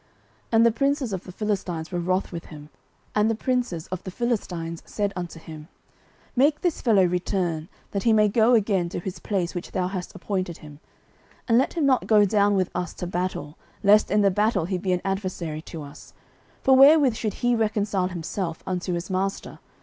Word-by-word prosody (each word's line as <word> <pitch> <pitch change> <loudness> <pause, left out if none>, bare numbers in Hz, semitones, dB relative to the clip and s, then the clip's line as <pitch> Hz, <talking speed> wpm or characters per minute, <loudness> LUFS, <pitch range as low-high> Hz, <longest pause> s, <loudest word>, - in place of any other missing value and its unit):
09:029:004 - - -36 0.4
And 225 +1 +6
the 235 - +5
princes 275 0 0
of 190 - -4
the 185 - -8
Philistines 185 -5 -3
were 175 - -1
wroth 185 +2 -1
with 170 -2 -6
him; 150 -1 -11 0.4
and 210 +1 +3
the 225 - +1
princes 240 -9 -1
of 185 -1 -5
the - - -6
Philistines 180 -7 -3
said 205 -2 -2
unto 175 -2 -6
him, 155 -1 -10 0.7
Make 285 +4 +3
this 350 -3 -1
fellow 210 -6 +4
return, 175 -2 -1 0.2
that 200 - -2
he 230 - +3
may 215 -1 +5
go 225 +3 +4
again 195 -5 +1
to - - -4
his 180 +1 -6
place 185 -4 -2
which 175 -2 -6
thou 185 -2 0
hast 185 -1 -6
appointed 185 -2 -3
him, 150 -1 -13 0.7
and 230 -1 +5
let 265 - 0
him 325 -4 0
not 265 -2 +2
go 210 -2 +6
down 205 0 +3
with 185 -2 0
us 180 -1 -3
to - - -5
battle, 175 -4 -4 0.2
lest 210 +1 +5
in 210 +1 +3
the 200 -1 +4
battle 205 -2 +1
he 185 +1 -2
be 185 +1 -1
an 180 -1 +1
adversary 185 -5 -3
to 160 -1 -8
us: 140 0 -13 0.5
for 265 - +6
wherewith 275 -1 +7
should 220 -2 -3
he 245 0 +4
reconcile 210 -4 0
himself 175 -1 -4
unto 180 0 -2
his 175 +2 -4
master? 195 +1 -3
190 Hz, 200 wpm, -25 LUFS, 175-220 Hz, 0.7 s, wherewith